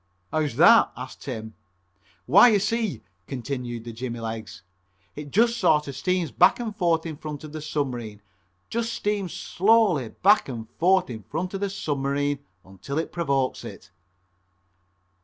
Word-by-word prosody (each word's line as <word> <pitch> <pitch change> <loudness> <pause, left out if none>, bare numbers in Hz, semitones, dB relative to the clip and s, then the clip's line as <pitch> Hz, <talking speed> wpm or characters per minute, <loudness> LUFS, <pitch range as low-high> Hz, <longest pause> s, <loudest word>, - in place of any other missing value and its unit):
"How's 150 -5 -1
that?" 200 - +6
asked 125 +1 -8
Tim. 110 -4 -6 0.7
"Why, 195 - +7
you 220 -4 +5
see," 210 - -1 0.2
continued 125 -3 -5
the 115 0 -8
jimmy 120 0 -5
legs, 110 -3 -6 0.5
"it 145 0 -7
just 230 - +2
sort 150 -5 +3
of 140 - -6
steams 180 +2 -1
back 180 +6 +4
and 225 -3 -4
forth 170 -5 +1
in 160 -3 -5
front 150 -1 -7
of 155 - -9
the 155 0 -6
submarine, 125 -9 -4 0.5
just 230 0 -1
steams 205 -4 -2
slowly 195 - +2
back 200 - +3
and 115 -3 -6
forth 185 -3 +3
in 110 -2 -7
front 170 - -4
of 195 - -3
the 200 0 -1
submarine 145 -5 -1 0.3
until 95 +10 -7
it 160 - -2
provokes 140 -6 -1
it." - - -10
150 Hz, 155 wpm, -25 LUFS, 125-190 Hz, 0.7 s, Why